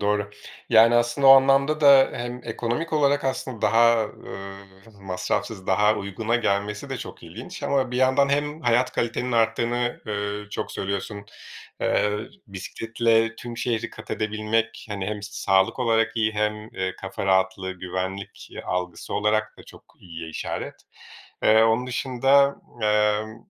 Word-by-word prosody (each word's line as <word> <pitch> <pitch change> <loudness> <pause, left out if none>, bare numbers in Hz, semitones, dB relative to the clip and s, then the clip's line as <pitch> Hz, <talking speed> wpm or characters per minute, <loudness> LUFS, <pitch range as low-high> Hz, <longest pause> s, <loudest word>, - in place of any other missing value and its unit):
Doğru, 105 0 0 0.4
yani 115 +1 +6
aslında 120 +3 +2
o - - +10
anlamda 135 +3 +5
da 140 -2 +7
hem 120 +1 -5
ekonomik 120 +8 -3
olarak 145 -1 +2
aslında 130 -3 -3
daha, 115 +1 +4
eee, 95 0 -11
m 100 -1 -18
masrafsız 95 +2 -3
daha 105 +3 +3
uyguna 110 +4 -2
gelmesi 105 -2 -2
de - - -2
çok - - -9
ilginç - - -9
ama 135 -3 0
bir 125 - -3
yandan 130 +2 +3
hem 145 +2 -1
hayat 120 0 +2
kalitenin 120 +2 -2
arttığını, 120 +1 0
eee, 105 0 -4
çok - - -4
söylüyorsun. 100 +1 -4 0.6
Eee, 105 0 +1 0.3
bisikletle 115 +3 0
tüm 120 0 -8
şehri 120 -2 -2
kat 110 - -12
edebilmek, 110 +1 -2
hani 100 -3 -4
hem 105 -1 -4
sağlık 95 -1 +1
olarak 115 -3 +2
iyi 110 -1 +1
hem, 105 0 -2
eee, 95 0 -3
kafa 95 0 -5
rahatlığı, 95 0 +1
güvenlik, 95 +2 -6
iii, - - -8
algısı 90 -1 -4
olarak 110 +1 0
da - - -12
çok - - -16 0.2
iyiye 85 -2 -8
işaret. 80 - -5 0.7
Eee, 110 +1 +6
onun 115 +2 +2
dışında, 135 +2 +2 0.3
emm, 105 +1 +1
110 Hz, 145 wpm, -24 LUFS, 100-120 Hz, 0.7 s, o